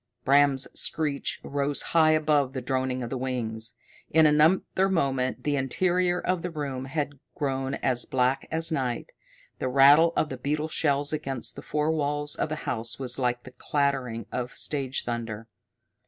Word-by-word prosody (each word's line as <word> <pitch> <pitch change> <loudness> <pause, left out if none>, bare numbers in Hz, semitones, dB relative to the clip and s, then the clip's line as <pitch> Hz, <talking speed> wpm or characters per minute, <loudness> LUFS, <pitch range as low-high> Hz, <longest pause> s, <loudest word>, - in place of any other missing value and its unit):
Bram's 140 -1 +4
screech 150 -3 0
rose 140 0 -1
high 160 -1 +5
above 150 -4 +2
the 130 - -3
droning 130 0 -1
of 115 - -6
the 130 - -2
wings. 115 -4 -3 0.3
In 160 0 +5
another 160 +5 +3
moment 135 -8 0
the 145 -1 +1
interior 180 +6 +1
of 185 -1 -1
the 180 - -3
room 140 -5 -4
had 145 0 -3 0.2
grown 135 -1 -2
as 125 -2 -1
black 130 +1 0
as 160 0 -2
night. 130 -6 -2 0.5
The - - -1
rattle 140 +5 +6
of 155 - +1
the 130 - -5
beetle 150 +4 -2
shells 145 -1 +1
against 135 -4 -2
the - - -8
four 150 +1 0
walls 145 -1 -1
of - - -2
the 155 - -2
house 115 -1 -3
was 130 -1 0
like 125 -1 0
the 130 - -11
clattering 125 -4 -1
of 125 0 -3
stage 135 -3 -1
thunder. 115 -2 -4
140 Hz, 165 wpm, -27 LUFS, 130-150 Hz, 0.5 s, rattle